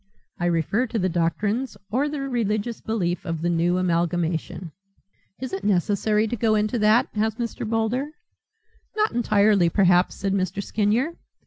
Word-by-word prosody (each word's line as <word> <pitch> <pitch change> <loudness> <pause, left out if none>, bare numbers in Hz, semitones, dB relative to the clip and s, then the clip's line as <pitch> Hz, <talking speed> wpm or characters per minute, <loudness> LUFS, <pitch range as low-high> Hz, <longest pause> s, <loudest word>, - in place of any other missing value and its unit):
I 175 - 0
refer 175 - +1
to 230 - -3
the 185 -2 +1
doctrines 205 +8 -1
or 275 +6 +1
the 290 -1 -4
religious 230 -4 -2
belief 180 -6 -2
of 165 -3 -4
the 175 - +1
new 170 +2 +1
amalgamation." 175 -1 -1 0.7
"Is 260 -4 -6
it 195 +1 -4
necessary 205 +2 +1
to 240 - -2
go 220 -1 +2
into 215 +3 0
that?" 215 +4 +4
asked 220 +1 0
Mr. 230 -2 -4
Boulder. 230 +5 0 0.9
"Not 430 0 +1
entirely, 205 -5 +3
perhaps," 180 0 +3
said 195 -1 -2
Mr. 190 0 -1
Skinyer. 220 - 0
210 Hz, 150 wpm, -24 LUFS, 180-230 Hz, 0.9 s, that